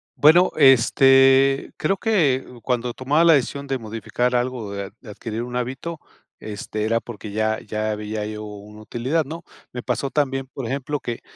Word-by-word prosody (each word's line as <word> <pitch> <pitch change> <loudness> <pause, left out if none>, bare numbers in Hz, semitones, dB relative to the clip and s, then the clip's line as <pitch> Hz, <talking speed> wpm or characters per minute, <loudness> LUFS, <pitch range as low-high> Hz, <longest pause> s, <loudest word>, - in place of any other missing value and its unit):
Bueno, 165 +5 +6
este, 135 0 +5
creo 195 - 0
que 160 - +1 0.2
cuando 125 -1 -1
tomaba 145 +7 +1
la 170 -1 +7
decisión 140 0 0
de 135 -1 -1
modificar 115 +3 -2
algo, 120 -4 -2
de 100 -1 -5
adquirir 110 0 -6
un 125 0 -7
hábito, 130 +7 -4 0.4
este, 105 0 -5
era 115 +1 +1
porque 110 -3 -9
ya 110 +1 0
ya 110 0 -2
veía 105 0 -4
yo 105 0 -6
una 105 +1 -11
utilidad, 125 +9 -1
¿no?, 165 +4 -8 0.3
me 125 - -5
pasó 140 - -2
también, 135 -3 -1
por 130 -4 -5
ejemplo, 140 +3 -3
que 120 -3 -5
125 Hz, 165 wpm, -22 LUFS, 110-135 Hz, 0.4 s, la